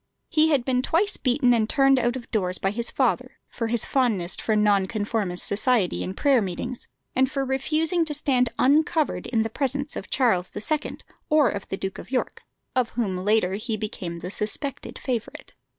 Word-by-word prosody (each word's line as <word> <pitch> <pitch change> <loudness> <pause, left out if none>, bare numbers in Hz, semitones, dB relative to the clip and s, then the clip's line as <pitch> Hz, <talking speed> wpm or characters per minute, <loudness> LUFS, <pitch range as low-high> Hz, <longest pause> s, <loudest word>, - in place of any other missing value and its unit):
He 320 -1 +4
had 275 -6 +2
been 255 -1 +1
twice 380 +10 +1
beaten 250 -1 +2
and 220 -2 +1
turned 270 -2 +4
out 240 0 0
of 250 -3 -8
doors 185 -4 +1
by 195 - 0
his 235 +3 0
father - - 0
for 230 - -4
his 230 -1 +2
fondness 220 -10 +1
for 220 - -1
Nonconformist 205 -2 +1
society 215 -2 +1
and 190 - -6
prayer 275 -4 +4
meetings, 215 +6 -4 0.3
and 260 0 +3
for 270 0 -2
refusing 310 +6 +1
to 300 -2 -2
stand 255 -4 +2
uncovered 305 +3 +2
in 225 -2 +1
the - - -1
presence 280 +3 -1
of - - -6
Charles 205 -9 +1
II. 300 +9 -2 0.3
or 300 -5 +4
of 200 -1 -5
the 195 - -4
Duke 190 0 -5
of - - -10
York, 255 -1 -2 0.3
of 250 -3 +2
whom 205 -6 0
later 190 0 +1
he 215 +2 -3
became 185 -5 -5
the 180 +2 -6
suspected 235 +7 -4
favourite. 240 -4 -5
240 Hz, 180 wpm, -25 LUFS, 205-275 Hz, 0.3 s, He